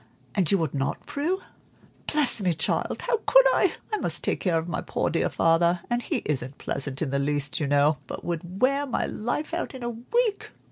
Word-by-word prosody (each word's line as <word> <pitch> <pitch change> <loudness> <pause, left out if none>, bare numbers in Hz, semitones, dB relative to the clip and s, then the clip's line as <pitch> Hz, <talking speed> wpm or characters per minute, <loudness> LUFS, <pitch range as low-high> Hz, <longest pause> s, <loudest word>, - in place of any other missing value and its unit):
"And 180 0 +1
you 200 - +5
would 160 -5 -1
not, 135 -1 -2
Prue?" 340 +7 -1 0.7
"Bless 295 -7 +2
me, 180 -4 +1
child, 165 - -1
how 475 - +1
could - - +7
I? - - +3 0.2
I - - +3
must - - -1
take - - 0
care 175 -4 +1
of 160 +1 -2
my 170 - -2
poor - - -1
dear - - +1
father, 170 +1 +3
and 240 0 +1
he - - -2
isn't 135 -2 -2
pleasant 140 +1 -3
in 140 - -2
the 140 - +1
least, 145 +2 0
you 150 - 0
know, 145 +1 +3
but - - -7
would 175 +2 -4
wear 275 +2 +3
my 250 - 0
life 270 +9 -3
out 340 -5 -3
in 255 - -7
a 240 - -1
week. 415 - -1
175 Hz, 215 wpm, -26 LUFS, -, 0.7 s, could